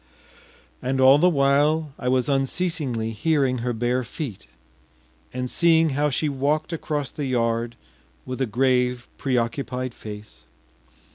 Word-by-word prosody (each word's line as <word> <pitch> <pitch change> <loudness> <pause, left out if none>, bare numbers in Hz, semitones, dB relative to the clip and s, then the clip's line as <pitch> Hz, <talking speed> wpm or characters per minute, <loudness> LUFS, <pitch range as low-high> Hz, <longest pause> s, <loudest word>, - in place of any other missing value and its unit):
” - - -29
And 130 +1 -1
all 135 +2 +7
the 180 +3 +5
while 145 +1 +2
I 125 - -4
was 130 -1 +2
unceasingly 135 -4 -1
hearing 135 +1 +1
her 120 +1 -1
bare 120 +2 0
feet, 120 - -7 0.8
and 125 0 -3
seeing 165 +2 +3
how 145 +2 +1
she 150 +3 0
walked 145 +4 -1
across 150 -3 -3
the 145 -2 -4
yard 115 -1 0 0.5
with 130 +1 -5
a 130 - +1
grave, 125 +1 +1
preoccupied 130 0 -1
face. 105 - -10
130 Hz, 135 wpm, -24 LUFS, 125-145 Hz, 0.8 s, all